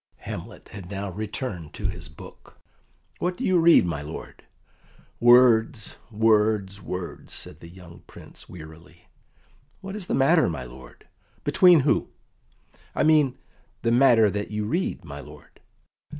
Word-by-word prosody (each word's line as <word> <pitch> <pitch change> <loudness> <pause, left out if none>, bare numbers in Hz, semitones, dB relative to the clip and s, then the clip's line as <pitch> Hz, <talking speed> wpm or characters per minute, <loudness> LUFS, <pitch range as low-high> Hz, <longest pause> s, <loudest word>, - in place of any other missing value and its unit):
Hamlet - - -9
had 95 -3 -10
now 100 -1 -5
returned 105 - -6
to - - -3
his - - -7
book. - - -15 0.6
"What 180 +1 -2
do 260 - -5
you 185 -2 +3
read, 165 - +6
my 85 -4 -3
lord?" 75 +2 -9 0.8
"Words 120 -2 +4
words 105 -3 +1
words," 90 -1 -7
said 75 - -6
the 85 - -12
young 90 -1 -14
Prince - - -15
wearily. 85 +1 -14 0.7
"What 195 +1 -8
is 200 -4 -6
the - - 0
matter, 155 - +3
my 80 -6 -5
lord?" 65 +1 -14 0.4
"Between 180 -4 +5
who?" 140 - +1 0.9
"I - - +1
mean, 150 -4 +3 0.5
the 115 - +1
matter 120 -4 +5
that 105 +1 -4
you 105 0 -3
read, 165 - -2
my 70 -3 -8
lord?" - - -15
105 Hz, 140 wpm, -24 LUFS, 90-135 Hz, 0.9 s, read